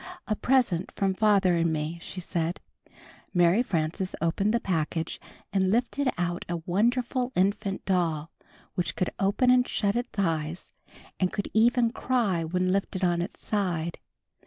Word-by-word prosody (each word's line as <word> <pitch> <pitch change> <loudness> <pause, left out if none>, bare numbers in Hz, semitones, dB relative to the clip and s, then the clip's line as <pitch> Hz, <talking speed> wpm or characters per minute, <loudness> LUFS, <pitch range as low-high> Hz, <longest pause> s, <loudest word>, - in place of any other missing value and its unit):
''A 215 - -2
present 245 -10 +2
from 195 -1 +1
father 200 -3 +3
and 170 -1 +2
me," 155 +2 -3
she 185 - -6
said. 170 -1 -2 0.8
Mary 175 +5 +5
Frances 180 -4 -1
opened 170 +6 +1
the 235 - +2
package 165 -4 -2 0.3
and 190 -1 +2
lifted 250 +5 +1
out 175 0 -1
a 175 - -1
wonderful 245 +6 +1
infant 195 +1 0
doll 170 -4 0 0.4
which 180 - -2
could 185 - -1
open 205 +6 +3
and 250 0 +4
shut 200 0 0
its 240 -2 -3
eyes 165 -3 -2 0.5
and 185 -1 +1
could 205 - -3 0.4
cry 220 -10 0
when 180 +3 0
lifted 195 -1 -1
on 175 -1 +2
its 175 - -7
side. 175 -5 -1
185 Hz, 145 wpm, -27 LUFS, 170-215 Hz, 0.8 s, Mary